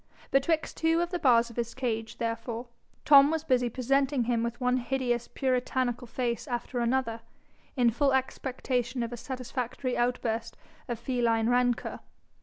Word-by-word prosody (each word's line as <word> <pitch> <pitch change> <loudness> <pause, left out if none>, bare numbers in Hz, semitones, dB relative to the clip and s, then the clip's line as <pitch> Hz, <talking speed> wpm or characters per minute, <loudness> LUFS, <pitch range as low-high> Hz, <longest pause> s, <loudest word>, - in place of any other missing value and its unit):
Betwixt 310 +4 +1
two 325 +1 +2
of 345 +1 -1
the 355 - -1
bars 235 -4 +4
of 235 - -15
his 235 -1 -2
cage, 225 -4 -3
therefore, 230 +1 -3 0.4
Tom 280 -1 +8
was 320 0 -1
busy 250 -5 +2
presenting 270 +2 +1
him 235 -1 0
with 235 0 -3
one 250 0 +2
hideous 245 -1 -1
puritanical 250 -2 -1
face 240 +2 -2
after 245 0 -3
another, 235 -1 0 0.5
in 245 -3 +4
full 275 +4 +2
expectation 255 -2 -1
of 235 +1 -4
a - - -3
satisfactory 255 0 -4
outburst 230 -2 -1 0.3
of 240 - -3
feline 235 -2 +1
rancour. 245 -1 +1
245 Hz, 150 wpm, -29 LUFS, 235-265 Hz, 0.5 s, Tom